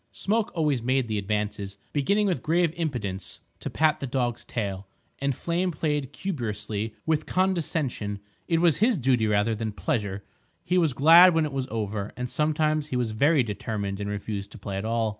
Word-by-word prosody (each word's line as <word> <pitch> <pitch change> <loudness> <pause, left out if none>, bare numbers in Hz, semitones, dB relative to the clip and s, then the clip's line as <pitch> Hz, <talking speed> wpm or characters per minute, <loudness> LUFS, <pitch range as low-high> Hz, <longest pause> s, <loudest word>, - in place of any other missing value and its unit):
Smoke 215 +2 0
always 150 -7 +1
made 130 +1 +1
the 110 -2 -1
advances, 100 -1 -3 0.2
beginning 200 +9 +2
with 185 -4 0
grave 165 0 +2
impudence 110 - -3 0.2
to - - -4
pat 155 -1 +2
the 135 - -4
dog's 120 -2 -1
tail, 100 -4 -4 0.3
and 140 -1 0
Flame 175 +5 -1
played 150 -4 -1
cumbrously, 110 - -4
with 155 -1 0
condescension. 155 - 0 0.3
It 165 -1 +2
was 170 -4 +4
his 225 +1 +3
duty, 125 -5 +2
rather 105 +2 +2
than 110 0 -3
pleasure; 105 -6 -2 0.4
he 180 0 +2
was 160 -6 +2
glad 165 +6 +8
when 160 -1 +3
it 150 - -5
was 135 -1 -2
over, 105 -2 -3
and 125 0 -2
sometimes 155 0 +1
he 130 - -4
was 120 -3 0
very 140 +5 +3
determined 105 -2 -3
and 100 0 -3
refused 105 -1 -4
to - - -10
play 100 -1 -5
at 100 - -3
all. 115 0 +1
130 Hz, 180 wpm, -26 LUFS, 105-160 Hz, 0.4 s, glad